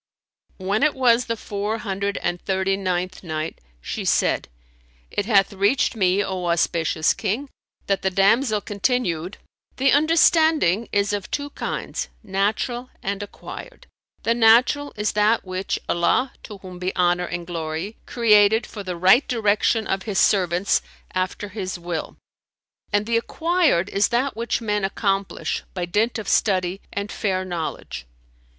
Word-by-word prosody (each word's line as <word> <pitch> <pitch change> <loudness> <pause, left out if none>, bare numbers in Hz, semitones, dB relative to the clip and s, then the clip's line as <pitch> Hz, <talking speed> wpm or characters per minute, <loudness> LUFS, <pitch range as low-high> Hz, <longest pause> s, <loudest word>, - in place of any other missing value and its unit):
When 200 +3 -1
it 305 -1 +3
was 245 -2 +3
the 230 -1 -2
Four 210 +1 -3
Hundred 200 -1 -3
and 175 0 -1
Thirty 190 0 0
ninth 185 -1 -2
Night, 155 -1 -4 0.2
She - - -4
said, - - +1 0.6
It 205 - -2
hath 200 -3 +3
reached 205 +7 +2
me, 195 -1 +2
O 185 -2 -3
auspicious 165 -2 +1
King, 230 +7 -3 0.4
that 195 -1 0
the 190 - +1
damsel 210 +4 +3
continued, 200 -5 -1 0.4
"The 270 +1 +3
understanding 310 - +4
is 200 0 +1
of 200 -2 -3
two 285 0 -3
kinds, - - -4
natural 220 +5 -1
and 200 +1 -2
acquired. 355 - -9 0.4
The 230 - +2
natural 240 +5 +4
is 210 -1 0
that 210 +1 +2
which 185 +1 -2
Allah 240 +9 +1
(to 210 - -9
whom 185 -2 -10
be 185 +1 -3
honour 180 0 +2
and 175 0 -5
glory!) 165 +4 -4
created 220 -1 +4
for 210 - -8
the 185 -3 -5
right 190 - +5
direction 220 -1 +1
of 195 - -1
His 195 - -1
servants 185 -1 +3 0.3
after 185 +2 -2
His 185 -2 -4
will; 170 -2 -5 0.7
and 205 0 +1
the 230 +1 +1
acquired 320 - +1
is 200 +1 +2
that 250 +3 0
which 235 +1 -2
men 210 -2 -1
accomplish 195 0 -1
by 180 -2 -2
dint 210 +7 0
of 220 - -6
study 185 -2 +1
and 200 0 -4
fair 185 -3 -1
knowledge." 160 - -5
200 Hz, 145 wpm, -23 LUFS, 185-230 Hz, 0.7 s, right